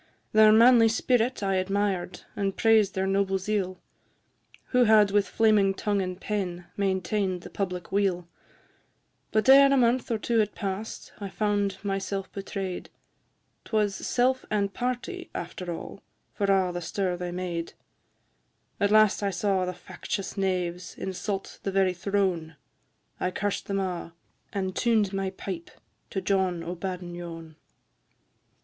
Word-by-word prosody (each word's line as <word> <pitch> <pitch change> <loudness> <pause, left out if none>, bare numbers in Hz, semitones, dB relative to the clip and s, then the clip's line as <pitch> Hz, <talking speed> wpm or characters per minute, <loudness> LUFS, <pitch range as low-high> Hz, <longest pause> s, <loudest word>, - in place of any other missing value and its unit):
Their 215 0 +7
manly 230 +1 +7
spirit 240 +1 +1
I 195 -1 +1
admired, 190 -1 -1
And 195 -1 -2
praised 220 -3 +4
their 190 0 0
noble 195 0 +1
zeal, 190 -1 -2 0.9
Who 250 -1 +4
had 215 -2 +5
with 205 0 +2
flaming 210 -3 +3
tongue 205 -1 0
and 185 0 -4
pen 180 -5 -3
Maintain'd 190 -1 0
the - - -10
public 180 -3 -4
weal; 190 -3 +1 1.0
But 215 +2 +1
e'er 275 +1 +8
a 275 - +4
month 245 0 +2
or 230 - +1
two 230 +1 0
had 210 -1 0
pass'd, 200 +2 -5
I 200 -2 -5
found 205 -1 0
myself 195 -1 -3
betray'd, 195 -2 -5 0.7
'Twas 210 -2 +1
self 255 +6 +1
and 200 -2 0
party, 255 +9 -3
after 175 +1 -5
all, 170 +3 -7 0.3
For 200 - -1
a' 190 -2 +3
the 175 0 -4
stir 180 +2 -1
they 175 0 -4
made; 175 -2 -4 1.1
At 200 -1 +3
last 215 -1 +5
I 200 - +1
saw 190 0 0
the 180 - -2
factious 190 +2 -5
knaves 180 -3 -2
Insult 195 +1 -4
the 195 - -2
very 190 -1 +2
throne, 180 -4 -1 0.6
I 185 - 0
cursed 200 +2 -2
them 200 - -1
a', 180 -3 -4 0.4
and 190 -2 -2
tuned 220 -5 +2
my 195 0 -1
pipe 185 -2 -6 0.4
To 190 - -3
John 185 -3 0
o' 170 +1 -4
Badenyon. 175 -3 -6
195 Hz, 140 wpm, -27 LUFS, 185-210 Hz, 1.1 s, e'er